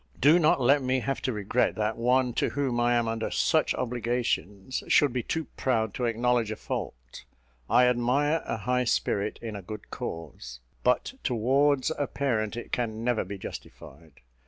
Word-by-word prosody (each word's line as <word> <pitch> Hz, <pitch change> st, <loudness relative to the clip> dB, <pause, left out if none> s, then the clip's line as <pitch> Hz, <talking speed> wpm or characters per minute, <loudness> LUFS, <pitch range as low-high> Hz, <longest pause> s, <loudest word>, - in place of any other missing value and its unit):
Do 150 Hz, +6 st, +6 dB
not 155 Hz, -4 st, +4 dB
let 140 Hz, +3 st, +4 dB
me 130 Hz, 0 st, 0 dB
have 135 Hz, +2 st, -2 dB
to 130 Hz, -, -1 dB
regret 105 Hz, +3 st, 0 dB
that 110 Hz, 0 st, -1 dB
one 125 Hz, +1 st, +2 dB
to -, -, 0 dB
whom 135 Hz, -4 st, -1 dB
I 120 Hz, 0 st, +3 dB
am 120 Hz, -1 st, +1 dB
under 115 Hz, 0 st, -2 dB
such -, -, +2 dB
obligations 120 Hz, -3 st, -2 dB
should 145 Hz, -4 st, +4 dB
be 125 Hz, -, 0 dB
too 160 Hz, +6 st, -3 dB
proud 110 Hz, -5 st, 0 dB
to 125 Hz, -, -2 dB
acknowledge 120 Hz, 0 st, +1 dB
a 110 Hz, -, -3 dB
fault. -, -, -6 dB, 0.5 s
I 125 Hz, -, +5 dB
admire 130 Hz, +6 st, +2 dB
a -, -, -2 dB
high 125 Hz, +3 st, 0 dB
spirit 105 Hz, -2 st, 0 dB
in 110 Hz, -2 st, -5 dB
a 100 Hz, -, -6 dB
good 105 Hz, +3 st, -9 dB
cause: 65 Hz, -7 st, -7 dB, 0.2 s
but 125 Hz, -, +1 dB
towards 135 Hz, +4 st, +2 dB
a 145 Hz, -, 0 dB
parent 115 Hz, -6 st, -1 dB
it 120 Hz, -, -7 dB
can 115 Hz, -2 st, -2 dB
never 120 Hz, -2 st, +1 dB
be 100 Hz, +2 st, -7 dB
justified. 75 Hz, -5 st, -11 dB
120 Hz, 175 wpm, -27 LUFS, 110-130 Hz, 0.5 s, Do